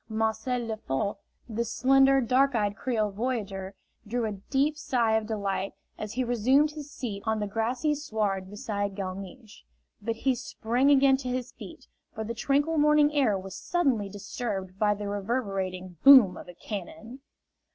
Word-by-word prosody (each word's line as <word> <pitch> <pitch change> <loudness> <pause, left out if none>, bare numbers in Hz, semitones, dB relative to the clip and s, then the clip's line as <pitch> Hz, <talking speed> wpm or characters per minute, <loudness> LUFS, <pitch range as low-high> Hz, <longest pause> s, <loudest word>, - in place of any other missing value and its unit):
Marcel 220 +3 -1
Lefort, 205 -3 -2 0.3
the 230 0 -2
slender, 270 +3 +4
dark 260 +2 +2
eyed 205 -2 0
Creole 220 -4 -1
voyageur, 200 -4 -3 0.3
drew 235 +2 -1
a 215 - -2 0.2
deep 290 +2 +2
sigh 245 -7 0
of 220 -1 0
delight 200 -3 -2 0.2
as 215 0 -6
he 255 +2 0
resumed 255 +5 +3
his 300 -1 -8
seat 220 -8 -5
on 220 0 +1
the 210 - -1
grassy 235 +8 0
sward 210 -9 -2
beside 205 -1 -3
Galmiche. 195 +3 -7 0.4
But 225 +2 -2
he 260 +3 +1
sprang 245 +2 0
again 275 -1 +5
to 260 -2 -5
his 250 0 -3
feet, - - -11 0.3
for 220 - -3
the 225 +2 -4
tranquil 285 +6 +1
morning 300 0 +4
air 255 -9 +2
was 190 0 -8
suddenly 250 - 0
disturbed 195 -2 -5
by 210 -1 +3
the 205 0 -5
reverberating 195 -4 -3
boom 255 -10 +9
of - - -10
a 175 - -11
cannon! 215 +6 -7
225 Hz, 160 wpm, -28 LUFS, 200-260 Hz, 0.4 s, boom